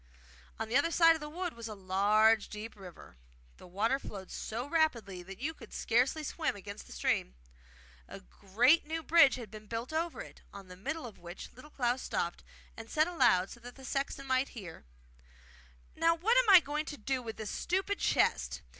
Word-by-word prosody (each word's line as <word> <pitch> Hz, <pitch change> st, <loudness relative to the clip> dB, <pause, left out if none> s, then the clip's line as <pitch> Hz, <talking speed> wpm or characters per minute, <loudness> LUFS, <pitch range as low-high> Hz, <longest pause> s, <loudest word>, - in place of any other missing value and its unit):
On 225 Hz, -, -3 dB
the 230 Hz, -, -3 dB
other 285 Hz, +5 st, +4 dB
side 330 Hz, 0 st, +6 dB
of -, -, -5 dB
the 300 Hz, -1 st, -7 dB
wood 350 Hz, +2 st, -4 dB
was 230 Hz, -1 st, -8 dB
a 215 Hz, -, -7 dB
large 205 Hz, +3 st, +3 dB
deep 215 Hz, +2 st, -7 dB
river. 180 Hz, -, -13 dB, 0.4 s
The -, -, -14 dB
water 220 Hz, +9 st, 0 dB
flowed 195 Hz, -7 st, -9 dB
so 230 Hz, +3 st, -4 dB
rapidly 240 Hz, -, 0 dB
that 190 Hz, +2 st, -10 dB
you 305 Hz, +5 st, -2 dB
could -, -, -14 dB
scarcely 255 Hz, +7 st, +1 dB
swim 315 Hz, -2 st, -2 dB
against 200 Hz, +1 st, -9 dB
the -, -, -14 dB
stream. -, -, -1 dB, 0.7 s
A -, -, -9 dB
great 230 Hz, -, +2 dB
new 325 Hz, +1 st, -3 dB
bridge 315 Hz, -4 st, +6 dB
had 230 Hz, -5 st, -8 dB
been 215 Hz, -1 st, -11 dB
built 230 Hz, +6 st, -5 dB
over 330 Hz, +1 st, -2 dB
it, -, -, -12 dB
on 200 Hz, -2 st, -11 dB
the 180 Hz, -, -9 dB
middle 280 Hz, -, -4 dB
of 225 Hz, -, -10 dB
which 175 Hz, +1 st, -9 dB
Little 255 Hz, +5 st, -14 dB
Klaus 250 Hz, -3 st, -1 dB
stopped, 170 Hz, 0 st, -3 dB, 0.3 s
and 225 Hz, 0 st, -10 dB
said 310 Hz, +1 st, +2 dB
aloud 195 Hz, -, +3 dB
so 240 Hz, -, -10 dB
that 245 Hz, +1 st, -11 dB
the 265 Hz, -, -12 dB
sexton 275 Hz, +1 st, -3 dB
might 260 Hz, 0 st, +1 dB
hear: 175 Hz, -, -9 dB, 1.1 s
'Now, 330 Hz, +1 st, +3 dB
what 415 Hz, +9 st, +2 dB
am -, -, +4 dB
I 305 Hz, -6 st, +6 dB
to 295 Hz, -, -7 dB
do 260 Hz, +4 st, -2 dB
with 225 Hz, -2 st, -7 dB
this 215 Hz, -1 st, -5 dB
stupid 385 Hz, +3 st, -1 dB
chest? -, -, +1 dB
245 Hz, 195 wpm, -32 LUFS, 205-315 Hz, 1.1 s, side